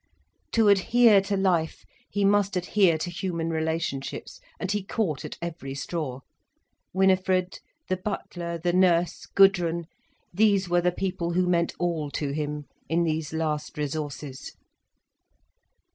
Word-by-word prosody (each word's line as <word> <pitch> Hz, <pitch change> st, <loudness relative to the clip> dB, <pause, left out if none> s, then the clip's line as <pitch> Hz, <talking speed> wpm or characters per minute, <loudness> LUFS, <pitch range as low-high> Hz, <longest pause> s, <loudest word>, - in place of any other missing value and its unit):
To 225 Hz, -2 st, +4 dB
adhere 205 Hz, +2 st, +5 dB
to 200 Hz, +1 st, -2 dB
life, 175 Hz, -4 st, 0 dB, 0.2 s
he 205 Hz, -1 st, 0 dB
must 200 Hz, -1 st, +3 dB
adhere 180 Hz, -1 st, +3 dB
to 175 Hz, +3 st, -4 dB
human 170 Hz, -2 st, -3 dB
relationships, 160 Hz, -4 st, -3 dB, 0.2 s
and 190 Hz, -, -2 dB
he 205 Hz, 0 st, 0 dB
caught 185 Hz, -8 st, -2 dB
at -, -, -7 dB
every 155 Hz, -5 st, -5 dB
straw. 140 Hz, -3 st, -4 dB, 0.7 s
Winifred, 185 Hz, -1 st, +2 dB, 0.3 s
the 185 Hz, -, 0 dB
butler, 175 Hz, -3 st, -4 dB
the 175 Hz, +1 st, -1 dB
nurse, 175 Hz, -2 st, +2 dB
Gudrun, 175 Hz, -4 st, +3 dB, 0.5 s
these 200 Hz, -1 st, +3 dB
were 175 Hz, 0 st, +2 dB
the 180 Hz, +1 st, +2 dB
people 175 Hz, -2 st, -2 dB
who 180 Hz, +1 st, +2 dB
meant 170 Hz, -1 st, +1 dB
all 165 Hz, -4 st, -1 dB
to 145 Hz, -2 st, -2 dB
him, 150 Hz, 0 st, -3 dB, 0.2 s
in 170 Hz, +2 st, +2 dB
these 155 Hz, -2 st, -1 dB
last 155 Hz, -2 st, -2 dB
resources. 145 Hz, -2 st, -5 dB
175 Hz, 130 wpm, -26 LUFS, 160-190 Hz, 0.7 s, adhere